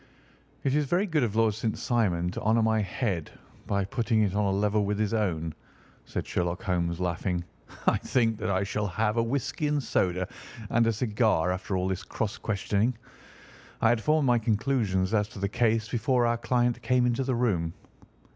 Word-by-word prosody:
"It 135 - +1
is 150 0 +2
very 175 +8 +1
good 160 -6 +1
of 110 -4 0
Lord 110 -1 +3
St. 110 +1 -2
Simon 90 -8 0
to - - -5
honour 110 +1 +3
my 110 0 +2
head 95 - -2 0.4
by 100 -1 0
putting 115 0 +1
it 100 -3 0
on 105 0 +1
a - - +2
level 105 +2 +1
with 100 0 -1
his 105 0 0
own," 85 -7 -1 0.5
said - - -4
Sherlock 90 +1 -2
Holmes, 85 -2 -1
laughing. 90 0 -1 0.4
"I - - +4
think 115 -4 +1
that 110 0 -2
I 95 0 +1
shall 105 +1 -2
have 105 +4 0
a - - +4
whisky 140 +5 -1
and 145 -1 0
soda 90 -4 0 0.4
and 115 0 +3
a - - +4
cigar 110 -6 +1
after 95 +1 -2
all 90 0 0
this 95 -1 -2
cross 105 +3 -4
questioning. 105 +3 0 0.8
I 115 - +4
had 120 -1 +2
formed 155 +3 +2
my 120 -2 +4
conclusions 110 -4 0
as 105 -2 +2
to 110 - -13
the 100 0 -1
case 110 0 +1
before 120 +2 +1
our 120 0 +2
client 120 -1 +1
came 125 -1 +2
into 125 +2 +1
the 130 -1 0
room." 90 -9 0
110 Hz, 195 wpm, -28 LUFS, 95-120 Hz, 0.8 s, I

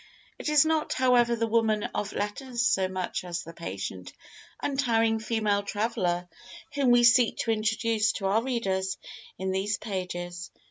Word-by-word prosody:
It - - -2
is 300 0 +5
not, 315 -1 +1
however, 245 -2 +3
the 230 0 0
woman 220 -2 +1
of 205 - -2
letters 235 +4 -2
so 190 -3 +3
much 185 -1 -3
as 175 0 -4
the 165 - -10
patient 95 - -6 0.5
untiring 230 -5 +1
female 215 -2 0
traveller 200 -4 -1 0.5
whom 280 -3 +2
we 245 0 +6
seek 235 0 +5
to 230 - 0
introduce 220 0 +1
to 195 - -4
our 200 +4 +3
readers 195 -7 -1 0.4
in 190 0 -2
these 200 +2 0
pages. 180 -3 -5
215 Hz, 150 wpm, -27 LUFS, 190-235 Hz, 0.5 s, we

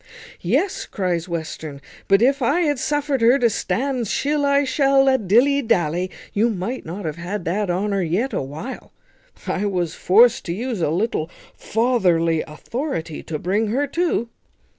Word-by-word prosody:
"Yes," 275 - 0
cries 180 -3 -2
Western, 160 -3 -5 0.3
"but 195 +3 +4
if 275 +2 +3
I 280 +8 +2
had 295 -5 +1
suffered 290 -2 -1
her 240 +4 +5
to 240 -4 +2
stand 255 +2 -1
shill 285 +6 0
I 280 0 +3
shall 275 0 +3
I, 265 -1 +5
dilly 245 +7 +3
dally, 180 - 0 0.2
you 220 +4 +2
might 215 +3 -4
not 180 +4 -6
have 155 0 -4
had 180 +2 -5
that 195 +3 -1
honour 195 +2 0
yet 185 +10 -1
a - - 0
while; 150 - -7 0.5
I 205 +2 -1
was 180 -4 -1
forced 230 +7 +4
to 170 - -2
use 230 0 -3
a 155 - +1
little 165 -2 -1 0.3
fatherly 180 -9 +1
authority 165 - -5
to 155 - -5
bring 200 +8 0
her 260 +7 0
to." 330 -8 0
215 Hz, 160 wpm, -21 LUFS, 175-265 Hz, 0.5 s, her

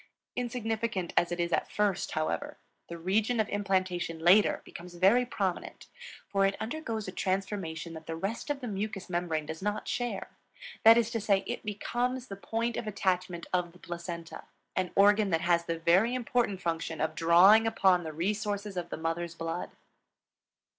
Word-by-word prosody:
Insignificant 225 -6 -2
as 175 - +3
it 175 - -3
is 170 0 0
at - - 0
first, 205 -3 0
however, 155 0 -2 0.3
the 170 - -7
region 210 +7 +1
of 215 - +2
implantation 185 -4 -1
later 180 +6 +4
becomes 175 0 -10
very 205 +8 +4
prominent, 195 -6 -3 0.4
for 195 -1 +1
it 195 0 +2
undergoes 225 -3 -4
a - - -4
transformation 185 -4 -3
that 160 -1 -10
the 165 - -3
rest 195 - -4
of 285 -1 -2
the 250 - -4
mucous 200 -2 -4
membrane 170 -3 -1
does 160 +3 -6
not 210 +2 -2
share. 245 -1 -3 0.5
That 225 +1 +9
is 235 -1 +1
to 230 -2 -2
say, 200 -2 +2
it - - -4
becomes 245 +4 -2
the 195 - -5
point 225 +3 -2
of 220 - -4
attachment 185 -4 -1
of 175 -2 0
the 180 - -18
Placenta, 170 -1 -7 0.3
an 185 -1 0
organ 205 +1 +5
that 165 -2 +1
has 170 -1 +2
the 165 0 -2
very 185 +9 +3
important 235 -5 0
function 165 -1 -2
of 155 - 0
drawing 185 +7 +6
upon 190 -5 +3
the 160 - -5
resources 205 +3 -2
of 175 -1 -3
the - - -4
mother's 165 +1 -3
blood. 165 +1 -4
190 Hz, 175 wpm, -30 LUFS, 170-220 Hz, 0.5 s, That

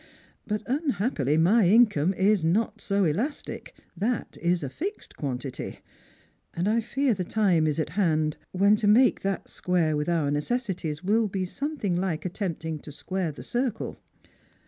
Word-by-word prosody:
But 210 0 -3
un 285 +5 0
happily 155 - +1
my 180 +4 +4
income 205 -6 +4
is 195 -1 +3
not 215 +6 +1
so 200 -1 +1
elastic 210 - -2
— - - -38
that 240 -1 -2
is 175 -1 +1
a - - -2
fixed 380 - -6
quantity; 130 -2 -4 0.8
and 175 +3 0
I 225 +2 +2
fear 270 +3 +1
the 185 -3 -2
time 180 -5 +2
is 150 0 0
at 155 - -1
hand 155 -4 +1 0.2
when 200 +3 +4
to 210 - 0
make 245 +5 +5
that 195 -1 -2
square 170 -4 0
with 150 +2 -1
our 160 -4 +1
necessities 175 - -2
will 215 +3 +2
be 190 -1 -2
something 270 - -2
hke 180 -3 -2
attempting 170 -4 -3
to 150 - -10
square 180 +3 -3
the 145 - -10
circle." 240 -2 -2
190 Hz, 165 wpm, -26 LUFS, 160-220 Hz, 0.8 s, make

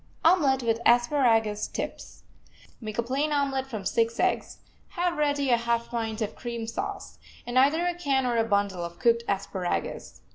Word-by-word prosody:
OMELET 285 -7 +4
WITH 230 -1 +1
ASPARAGUS 235 -4 +3
TIPS - - -6 0.6
Make 215 -2 -6
a 235 - +1
plain 275 +5 -1
omelet 275 -2 0
from 215 -7 -6
six 230 +3 0
eggs, - - 0 0.4
have 350 0 +1
ready 285 -3 +1
a 240 - +5
half 235 0 -1
pint 225 -1 -2
of 210 - -5
cream 235 -2 -5
sauce, 390 - -5 0.3
and 245 +1 +2
either 305 +6 +3
a 355 - +1
can 275 -6 0
or 245 -1 0
a 225 - +3
bundle 200 -4 0
of 170 0 -7
cooked 235 -1 +2
asparagus. 190 - -3
240 Hz, 170 wpm, -27 LUFS, 225-280 Hz, 0.6 s, a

